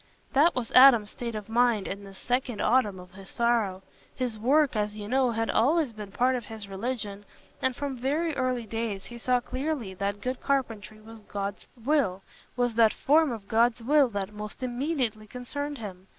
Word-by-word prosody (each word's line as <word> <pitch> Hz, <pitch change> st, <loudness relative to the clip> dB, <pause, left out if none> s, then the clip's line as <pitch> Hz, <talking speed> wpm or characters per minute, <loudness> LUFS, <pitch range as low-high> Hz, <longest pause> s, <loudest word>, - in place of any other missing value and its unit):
That 300 Hz, +6 st, +4 dB
was 250 Hz, -3 st, -3 dB
Adam's 245 Hz, -5 st, +7 dB
state 235 Hz, -2 st, -5 dB
of 210 Hz, -2 st, -6 dB
mind 230 Hz, -2 st, +2 dB
in 200 Hz, +1 st, -5 dB
this 195 Hz, -1 st, -11 dB
second 245 Hz, -1 st, -2 dB
autumn 215 Hz, -6 st, +2 dB
of 180 Hz, 0 st, -13 dB
his 195 Hz, 0 st, -12 dB
sorrow. 225 Hz, -6 st, 0 dB, 0.3 s
His 245 Hz, -4 st, -3 dB
work, 275 Hz, +4 st, +3 dB
as 210 Hz, 0 st, -1 dB
you 205 Hz, -1 st, -6 dB
know, 260 Hz, +2 st, +2 dB
had 225 Hz, -1 st, -1 dB
always 285 Hz, +2 st, +2 dB
been 210 Hz, -2 st, -8 dB
part 250 Hz, +5 st, +2 dB
of 240 Hz, -3 st, -4 dB
his 220 Hz, -2 st, -8 dB
religion, 205 Hz, 0 st, -4 dB, 0.4 s
and 260 Hz, -1 st, +1 dB
from 280 Hz, -1 st, -4 dB
very 300 Hz, +5 st, 0 dB
early 255 Hz, -3 st, -1 dB
days 220 Hz, -3 st, -4 dB
he 240 Hz, 0 st, -9 dB
saw 250 Hz, +1 st, +2 dB
clearly 255 Hz, -4 st, -3 dB
that 200 Hz, +2 st, -3 dB
good 255 Hz, +3 st, -4 dB
carpentry 225 Hz, -6 st, -2 dB
was 225 Hz, +1 st, -13 dB
God's 200 Hz, -1 st, -5 dB, 0.2 s
will—was 245 Hz, -2 st, -1 dB
that 225 Hz, -1 st, +4 dB
form 305 Hz, 0 st, +3 dB
of 215 Hz, -4 st, -7 dB
God's 230 Hz, +1 st, +2 dB
will 285 Hz, +1 st, +4 dB
that 200 Hz, -1 st, -4 dB
most 210 Hz, +4 st, -7 dB
immediately 245 Hz, -4 st, -2 dB
concerned 285 Hz, +5 st, -5 dB
him. 190 Hz, -4 st, -8 dB
235 Hz, 180 wpm, -27 LUFS, 210-255 Hz, 0.4 s, Adam's